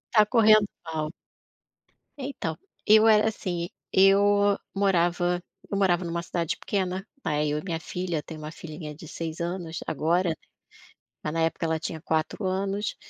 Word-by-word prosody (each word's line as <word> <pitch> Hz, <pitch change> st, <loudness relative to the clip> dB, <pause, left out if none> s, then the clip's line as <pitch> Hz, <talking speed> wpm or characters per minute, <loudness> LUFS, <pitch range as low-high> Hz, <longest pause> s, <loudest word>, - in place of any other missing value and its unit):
Tá 215 Hz, -, +7 dB
correndo 215 Hz, -2 st, +6 dB, 0.2 s
mal. 160 Hz, -1 st, -3 dB, 1.1 s
Então 260 Hz, -, -4 dB, 0.3 s
eu 215 Hz, +1 st, +7 dB
era, 215 Hz, 0 st, +6 dB
assim, 175 Hz, -5 st, -3 dB, 0.2 s
eu 200 Hz, +1 st, +5 dB, 0.2 s
morava 175 Hz, -2 st, +2 dB, 0.3 s
eu 200 Hz, -, 0 dB
morava 185 Hz, -2 st, +3 dB
numa 170 Hz, 0 st, -2 dB
cidade 170 Hz, -1 st, -2 dB
pequena, 190 Hz, 0 st, -2 dB, 0.2 s
né, 150 Hz, 0 st, +1 dB
eu 150 Hz, 0 st, 0 dB
e -, -, -9 dB
minha 170 Hz, -4 st, -3 dB
filha. 175 Hz, -2 st, -3 dB
Tenho 155 Hz, 0 st, -9 dB
1 155 Hz, +1 st, -6 dB
filhinha 155 Hz, -2 st, -8 dB
de 160 Hz, +2 st, -11 dB
seis 160 Hz, +1 st, -5 dB
anos 170 Hz, -1 st, -3 dB
agora, 165 Hz, +2 st, +1 dB, 0.9 s
mas 150 Hz, -, -2 dB
na 165 Hz, -, 0 dB
época 165 Hz, +1 st, 0 dB
ela 160 Hz, 0 st, 0 dB
tinha 160 Hz, 0 st, -4 dB
quatro 160 Hz, +5 st, -1 dB
anos. 195 Hz, +2 st, -1 dB
175 Hz, 150 wpm, -27 LUFS, 160-200 Hz, 1.1 s, Tá